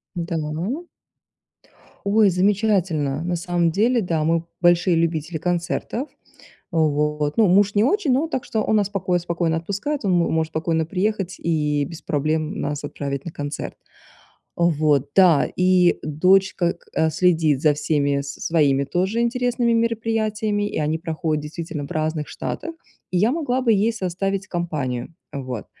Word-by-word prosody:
Да. 170 -1 -3 1.7
Ой, 205 0 +4
замечательно. 180 -7 +1
На 175 0 -1
самом 175 -1 0
деле, 230 +7 +2
да, 165 -5 -1
мы 165 +1 +1 0.2
большие 175 0 +4
любители 165 0 -1
концертов. 175 - -2 0.6
Вот, 150 -1 0
ну, 220 - +5
муж 200 +3 +4
не 205 - +4
очень, 310 - +2
но 280 +6 +2
так 265 -6 -3
что 220 - -2
он 215 - +2
нас 205 -2 +1
покое 180 -3 0
спокойно 170 -1 -1
отпускает, 205 - -3
он 195 - +1
м 175 -2 +2
может 160 0 0
спокойно 160 0 0
приехать 195 +1 -1
и 150 -3 0
без 165 0 -9
проблем 155 +4 -1
нас 145 0 -3
отправить 140 -1 -4
на 170 - -5
концерт. 145 -1 -5 0.8
Вот, 150 -4 +2
да, 180 -6 +5
и 180 -1 +3
дочка 180 +3 +2
к - - -26
э, 160 - +2
следит 160 -6 +2
за 150 -2 +4
всеми 145 -2 0
своими 140 0 +1
тоже 190 +10 0
интересными 245 0 +1
мероприятиями, 220 -2 0
и - - -3
они 155 +1 0
проходят 160 -2 -2
действительно 155 -1 -5
в - - -11
разных 155 -1 -2
штатах, 330 0 -5 0.4
и 180 - +1
я 215 +6 +3
могла 270 -4 -1
бы 235 - +3
ей 215 +2 +2
составить 195 -1 -2
компанию. 155 -7 -3 0.2
Вот, 130 -6 -5
175 Hz, 150 wpm, -22 LUFS, 155-205 Hz, 1.7 s, ну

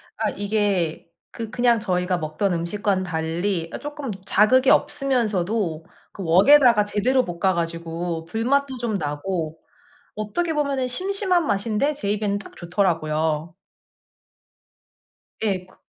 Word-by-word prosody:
아 215 -1 -1
이게 200 -5 -1 0.3
그 225 -2 -6
그냥 240 -3 +2
저희가 180 -3 0
먹던 160 +4 -1
음식과는 190 +3 -1
달리 165 +1 -2
아 - - -3
쪼끔 290 -3 -6 0.2
자극이 255 +7 +4
없으면서도 215 - +1 0.3
그 195 - -7
웍에다가 220 - +6
제대로 250 +6 +1
볶아가지고 170 -1 -2
불맛도 260 +8 0
좀 235 -3 -2
나고 160 +1 -3 0.6
어떻게 320 +12 -2
보면은 280 -4 0
심심한 365 +4 0
맛인데 215 +8 0
제 205 -8 -3
입에는 205 -1 -1
딱 205 - -12
좋더라고요. 160 -3 -1 1.9
예. 190 -4 -1
그 185 - -23
200 Hz, 265 characters per minute, -23 LUFS, 170-245 Hz, 1.9 s, 웍에다가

